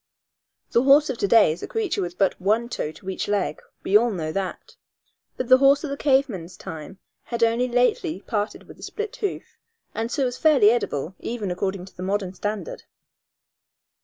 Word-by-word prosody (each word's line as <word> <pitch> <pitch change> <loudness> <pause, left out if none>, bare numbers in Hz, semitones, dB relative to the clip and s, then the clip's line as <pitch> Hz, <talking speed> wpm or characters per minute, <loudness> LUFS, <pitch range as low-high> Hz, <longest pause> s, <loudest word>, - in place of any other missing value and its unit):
The 235 - +4
horse 280 +2 +5
of 245 - -7
to 200 - +1
day 220 -6 +6
is 165 - -6
a - - -5
creature 425 - -1
with 175 -1 -5
but 195 -2 +3
one 220 +5 +1
toe 155 - -3
to 185 - -16
each 190 - -3
leg 200 -7 -1 0.2
we 195 - 0
all 235 +3 +6
know 165 -7 -3
that 195 - -5 0.6
but 255 - -3
the 255 +1 +7
horse 275 +1 +5
of 300 - -4
the - - -2
cave 275 -1 +3
man's 180 -6 -8
time 160 +4 -8 0.3
had 235 -1 -2
only 230 +2 +2
lately 245 -8 +1
parted 210 -1 -3
with - - -13
the - - -17
split 430 -1 -5
hoof, 405 - -5 0.3
and 225 +2 -3
so 275 - 0
was 245 0 -3
fairly 270 -10 +6
edible, 165 - -2
even 220 -5 -4
according 190 0 -3
to 190 - -16
the - - -9
modern 190 0 -2
standard. 215 - -4
215 Hz, 195 wpm, -24 LUFS, 190-255 Hz, 0.6 s, the